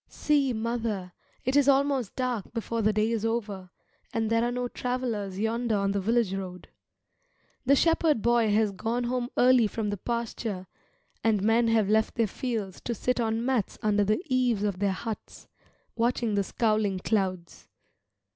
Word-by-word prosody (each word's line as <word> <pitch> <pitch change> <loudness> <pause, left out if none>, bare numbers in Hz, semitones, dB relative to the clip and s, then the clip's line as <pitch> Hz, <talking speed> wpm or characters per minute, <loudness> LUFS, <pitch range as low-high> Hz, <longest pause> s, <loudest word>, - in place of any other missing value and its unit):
See, 285 -3 +1
mother, 225 -5 -2 0.3
it 260 +2 +1
is 285 -1 +5
almost 275 -4 +2
dark 250 -6 -2
before 230 0 -2
the 215 0 +3
day 215 +2 +1
is 225 -2 -1
over, 210 -5 -2 0.4
and 225 -1 -1
there 230 0 +3
are 240 - 0
no 245 0 -2
travellers 235 -7 -3
yonder 225 +1 0
on 200 0 +1
the 200 0 -1
village 225 -1 +1
road. 185 -2 -6 1.0
The 280 - +6
shepherd 320 -5 +2
boy 235 -2 +3
has 215 0 +3
gone 225 +5 -2
home 245 0 -1
early 250 -2 +5
from 210 0 -3
the 205 - -3
pasture, 225 -3 -3 0.6
and 215 -3 +2
men 230 +2 +3
have 225 -3 +3
left 220 +1 +2
their 230 - +2
fields 215 -3 -4
to 235 - -1
sit 250 +3 -1
on 225 0 0
mats 250 -6 0
under 210 -1 +3
the 215 - 0
eaves 250 -7 +1
of 200 -3 -1
their 200 0 +2
huts, 220 +3 -6 0.5
watching 235 -1 0
the 200 -1 +2
scowling 215 -2 0
clouds. 185 -3 -2
225 Hz, 165 wpm, -27 LUFS, 205-245 Hz, 1.0 s, The